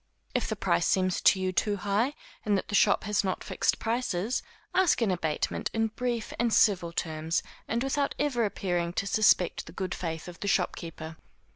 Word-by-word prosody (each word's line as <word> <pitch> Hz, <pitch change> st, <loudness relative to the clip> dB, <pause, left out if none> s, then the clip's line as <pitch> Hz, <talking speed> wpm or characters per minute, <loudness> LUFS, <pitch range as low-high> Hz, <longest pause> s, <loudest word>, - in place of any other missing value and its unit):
If -, -, 0 dB
the -, -, -1 dB
price 85 Hz, -, +1 dB
seems 185 Hz, -1 st, +1 dB
to 190 Hz, -, +5 dB
you 185 Hz, 0 st, 0 dB
too 205 Hz, +3 st, +1 dB
high, 205 Hz, +9 st, 0 dB, 0.3 s
and 205 Hz, -1 st, +2 dB
that -, -, -4 dB
the -, -, -6 dB
shop -, -, +4 dB
has 210 Hz, -1 st, +1 dB
not 185 Hz, -2 st, -2 dB
fixed -, -, 0 dB
prices, 225 Hz, -1 st, -1 dB, 0.3 s
ask 370 Hz, -2 st, +3 dB
an 210 Hz, -, +2 dB
abatement 160 Hz, -4 st, -1 dB
in 225 Hz, 0 st, +1 dB
brief 240 Hz, 0 st, -3 dB
and 235 Hz, -1 st, +2 dB
civil 185 Hz, -6 st, +3 dB
terms, 160 Hz, 0 st, -2 dB, 0.2 s
and 235 Hz, +2 st, -1 dB
without 280 Hz, +1 st, 0 dB
ever 275 Hz, -5 st, +1 dB
appearing 175 Hz, -4 st, -1 dB
to 200 Hz, -, -1 dB
suspect 200 Hz, -4 st, +3 dB
the -, -, -9 dB
good 185 Hz, +1 st, -3 dB
faith 165 Hz, -2 st, -4 dB
of 175 Hz, -1 st, -10 dB
the 200 Hz, -, -4 dB
shopkeeper. 165 Hz, -4 st, -2 dB
195 Hz, 185 wpm, -28 LUFS, 175-225 Hz, 0.3 s, to